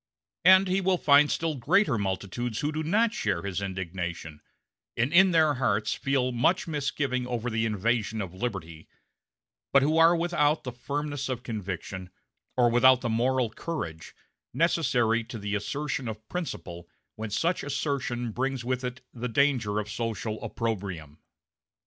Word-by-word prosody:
And 190 +2 +7
he 185 +1 +1
will 185 -1 +2
find 145 -2 +5
still 165 -1 0
greater 150 - +2
multitudes 100 +3 -3
who 150 - 0
do 155 +1 -3
not 215 +8 +2
share 100 - -1
his 100 0 -3
indignation, 85 -4 -5 0.6
and 125 +7 +1
in 190 +2 +7
their 160 -3 +4
hearts 110 -5 0
feel 135 -2 0
much 125 +11 +1
misgiving 140 -4 -1
over 120 -1 -2
the 110 0 0
invasion 110 +1 0
of 95 -4 -4
liberty, 95 -7 -5 0.8
but 135 - +5
who 155 +3 +2
are 165 +1 +7
without 165 -3 +1
the 125 - -4
firmness 140 +3 -4
of 125 -1 -3
conviction, 95 -4 -5 0.5
or 120 -1 +5
without 130 +1 +6
the 120 - -2
moral 120 +1 +1
courage, 85 - -6 0.4
necessary 125 -9 +2
to 115 0 -7
the 100 -1 -4
assertion 135 +5 -2
of 110 0 -7
principle 90 - -5 0.3
when 110 0 -5
such 165 - 0
assertion 135 -4 -2
brings 130 +1 -2
with 130 0 -1
it 125 +1 -5
the 125 +1 -4
danger 125 -5 +2
of 105 -1 -2
social 110 0 -4
opprobrium. 95 -10 -4
125 Hz, 150 wpm, -27 LUFS, 105-145 Hz, 0.8 s, And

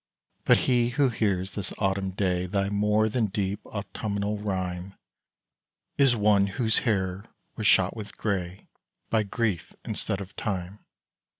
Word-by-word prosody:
But - - +6
he 120 -2 +3
who 135 +2 +2
hears 100 -5 0
this 100 -3 -3
autumn 95 -1 0
day 90 -1 0
Thy 100 +1 0
more 105 +1 +2
than 110 0 +1
deep 100 +1 -2
autumnal 100 0 -3
rhyme, 95 -2 -3 1.0
Is 135 -4 +4
one 105 -2 +4
whose 110 +3 +1
hair 95 -2 0 0.3
was 110 - 0
shot 95 0 +4
with 105 -2 -8
grey 95 -3 -3 0.4
By 110 - +4
Grief 105 -3 -2
instead 100 - -2
of 100 +1 -8
Time. 95 0 -3
100 Hz, 135 wpm, -27 LUFS, 95-110 Hz, 1.0 s, But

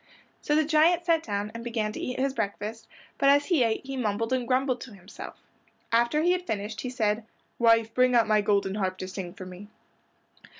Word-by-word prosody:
So 295 - +1
the 310 0 +3
giant 325 +3 +3
sat 330 -2 +3
down 205 -4 -3
and 230 0 -7
began 225 -3 -2
to - - -7
eat 250 - -4
his 270 0 0
breakfast, 215 0 -4 0.3
but 275 - +4
as 285 +1 +5
he 345 -7 +2
ate 230 +1 0
he 270 0 -5
mumbled 225 0 -1
and 250 -2 -1
grumbled 255 0 +1
to 230 -6 -9
himself. 190 +1 -10 0.5
After 235 +7 +2
he 350 - +4
had 360 0 -1
finished 210 +1 -3
he 255 - -4
said, 220 -3 0 0.4
"Wife, 230 -1 +4
bring 250 0 +3
out 230 -2 +5
my 215 -1 +3
golden 200 -1 +1
harp 190 -2 -2
to 185 - -5
sing 185 -2 -6
for 190 - -8
me." 185 +2 -10
230 Hz, 210 wpm, -27 LUFS, 210-270 Hz, 0.5 s, as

